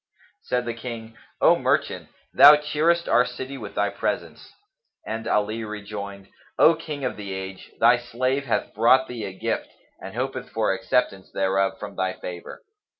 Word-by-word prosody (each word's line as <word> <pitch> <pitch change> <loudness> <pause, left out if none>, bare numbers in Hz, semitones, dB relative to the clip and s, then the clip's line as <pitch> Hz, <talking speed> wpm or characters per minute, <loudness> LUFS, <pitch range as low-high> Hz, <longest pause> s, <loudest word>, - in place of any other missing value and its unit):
Said 125 0 -1
the 120 - -2
King, 115 -1 -8 0.3
"O - - +6
merchant, - - 0 0.2
thou 145 +1 +10
cheerest 155 +3 +1
our 125 - +5
city 130 +2 -6
with - - -8
thy - - +1
presence!" - - -4 0.5
and 115 +1 -4
Ali 105 +2 0
rejoined, 100 -2 -7 0.3
"O 165 - +7
King 150 -4 -6
of 125 - -3
the 100 -2 -6
age, 95 0 -7
thy 120 +2 +6
slave 130 +3 -1
hath 120 - -1
brought 130 +4 +4
thee 120 -3 -5
a - - -5
gift - - -2 0.3
and 95 +2 -8
hopeth 130 0 -3
for 110 -3 0
acceptance 95 0 -1
thereof 95 0 0
from 100 -1 -8
thy 95 0 -1
favour." 90 -1 -8
115 Hz, 160 wpm, -24 LUFS, 100-130 Hz, 0.5 s, thou